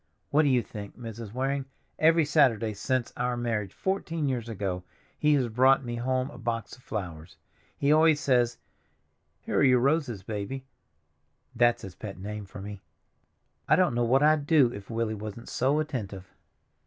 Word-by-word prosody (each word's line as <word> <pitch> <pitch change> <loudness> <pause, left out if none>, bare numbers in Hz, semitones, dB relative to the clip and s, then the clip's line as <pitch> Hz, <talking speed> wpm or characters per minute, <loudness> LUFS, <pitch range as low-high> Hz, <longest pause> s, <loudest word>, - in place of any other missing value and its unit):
What 150 - +5
do 150 - +2
you 125 -3 +3
think, 100 -1 -9
Mrs. 115 -3 -7
Waring, 135 +3 -1 0.3
every 165 0 +5
Saturday 115 -6 +3
since 125 +4 -1
our 125 0 -1
marriage, 115 -4 -2
fourteen 165 -5 -2
years 120 -3 -2
ago, 95 -4 -3 0.4
he 150 -1 +4
has 130 -4 +1
brought 130 +3 +4
me 120 0 -4
home 130 +3 -1
a 125 - -11
box 115 -2 -3
of 130 - -21
flowers! 85 -9 -6 0.4
He 140 +1 +2
always 155 0 +5
says, 120 -4 +2 0.8
'Here - - -1
are - - +4
your 130 -2 +6
roses, 130 - +1
Baby'—that's 120 +2 -4
his 95 - -7
pet 100 +3 -8
name 105 +2 -6
for 95 - -9
me. 100 0 -8 0.9
I - - +7
don't 180 -7 +3
know 120 0 +1
what 130 +4 +3
I'd 150 -1 +3
do 140 -7 +5
if 100 -1 -9
Willie 115 -1 -1
wasn't 110 +2 -7
so 135 +4 +1
attentive." 105 -11 -5
120 Hz, 165 wpm, -28 LUFS, 105-140 Hz, 0.9 s, I